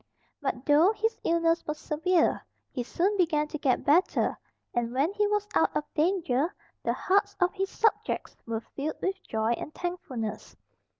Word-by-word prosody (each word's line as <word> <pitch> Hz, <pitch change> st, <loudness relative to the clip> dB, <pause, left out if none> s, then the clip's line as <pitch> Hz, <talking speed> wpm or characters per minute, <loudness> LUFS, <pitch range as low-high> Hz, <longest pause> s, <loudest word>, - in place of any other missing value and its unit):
But 270 Hz, -2 st, -2 dB
though 305 Hz, +7 st, +6 dB
his 445 Hz, +1 st, 0 dB
illness 335 Hz, 0 st, +2 dB
was 300 Hz, 0 st, -2 dB
severe 325 Hz, +3 st, +1 dB, 0.3 s
he 250 Hz, -, -3 dB
soon 360 Hz, -, 0 dB
began 310 Hz, -4 st, +2 dB
to 305 Hz, -, -4 dB
get 260 Hz, -3 st, +1 dB
better, 335 Hz, +7 st, +3 dB, 0.4 s
and 240 Hz, -1 st, 0 dB
when 295 Hz, +8 st, +2 dB
he 415 Hz, 0 st, +2 dB
was 415 Hz, 0 st, 0 dB
out -, -, +2 dB
of 300 Hz, -, -1 dB
danger 320 Hz, -3 st, +1 dB, 0.3 s
the -, -, 0 dB
hearts 405 Hz, +1 st, +1 dB
of 360 Hz, -1 st, +2 dB
his 390 Hz, -1 st, -1 dB
subjects 445 Hz, -, 0 dB
were 225 Hz, -1 st, -2 dB
filled 285 Hz, +6 st, -5 dB
with 385 Hz, 0 st, -2 dB
joy 220 Hz, -5 st, -1 dB
and 240 Hz, -, -3 dB
thankfulness. 255 Hz, -, -4 dB
330 Hz, 165 wpm, -28 LUFS, 275-380 Hz, 0.4 s, though